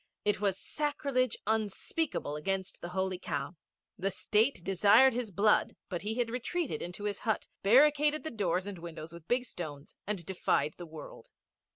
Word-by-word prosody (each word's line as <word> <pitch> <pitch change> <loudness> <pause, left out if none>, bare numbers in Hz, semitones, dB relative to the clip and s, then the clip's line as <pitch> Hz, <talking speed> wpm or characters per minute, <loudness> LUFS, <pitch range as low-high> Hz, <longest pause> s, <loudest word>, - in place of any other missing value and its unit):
It 210 -1 +2
was 195 -2 +1
sacrilege 280 -5 -1
unspeakable 220 - -1
against 190 +5 -2
the 175 - -5
Holy 190 0 -1
Cow. 145 +2 -3 0.4
The 195 +2 +1
State 215 +2 +2
desired 200 +8 +6
his 240 -2 -2
blood, 205 +3 +3
but 175 -3 -3
he 215 +2 -2
had 240 -2 0
retreated 255 - -2
into 180 +4 -6
his 205 -1 -2
hut, 220 -2 -1
barricaded 295 +7 +5
the 315 - -4
doors 190 -4 0
and 200 -3 -6
windows 165 -1 -8
with 170 -1 -12
big 245 +1 +1
stones, 150 - -7
and 200 -5 -2
defied 180 -4 +1
the 175 - -7
world. 155 -2 -10
200 Hz, 165 wpm, -31 LUFS, 175-245 Hz, 0.4 s, desired